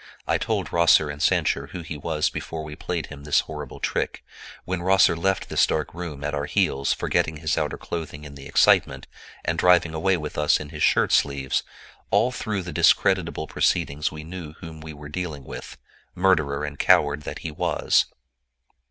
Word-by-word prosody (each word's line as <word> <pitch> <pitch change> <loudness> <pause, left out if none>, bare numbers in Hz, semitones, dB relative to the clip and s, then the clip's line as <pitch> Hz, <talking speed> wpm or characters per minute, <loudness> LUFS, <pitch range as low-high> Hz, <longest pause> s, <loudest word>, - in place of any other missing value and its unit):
I - - +1
told - - -2
Rosser 85 -3 +5
and 75 +1 -8
Sancher 70 0 +2
who 90 +4 -7
he 80 - -6
was 75 +1 -1
before 80 -1 -5
we 75 -1 -8
played 85 0 -3
him 70 -1 -11
this 75 -1 +3
horrible 75 -4 -8
trick. - - -2 0.4
When 90 -1 -2
Rosser 95 -1 +4
left 95 +3 0
this - - +3
dark 75 -1 -2
room 80 -5 -6
at 75 +1 -2
our 70 0 -1
heels, 70 +1 +1
forgetting 80 -1 0
his 80 0 -1
outer 75 -3 -1
clothing 80 -3 -6
in 70 -1 -9
the 70 -1 -10
excitement, - - +3 0.4
and - - -1
driving 90 -2 +4
away 90 +4 +1
with 75 -2 -5
us 75 - +3
in 75 - -7
his - - -8
shirt - - +3
sleeves—all 70 - 0
through 105 -5 -3
the 85 -2 -7
discreditable 85 -2 +3
proceedings 75 -1 0
we 75 0 -8
knew 85 0 -7
with 75 - -13
whom 80 -1 -10
we 80 0 -8
were 75 -1 -10
dealing, 75 -3 -5 0.7
murderer 80 -6 +2
and 75 -1 -7
coward 75 0 +4
that - - -6
he 80 - -2
was!" 75 - +2
80 Hz, 180 wpm, -24 LUFS, 75-85 Hz, 0.7 s, Rosser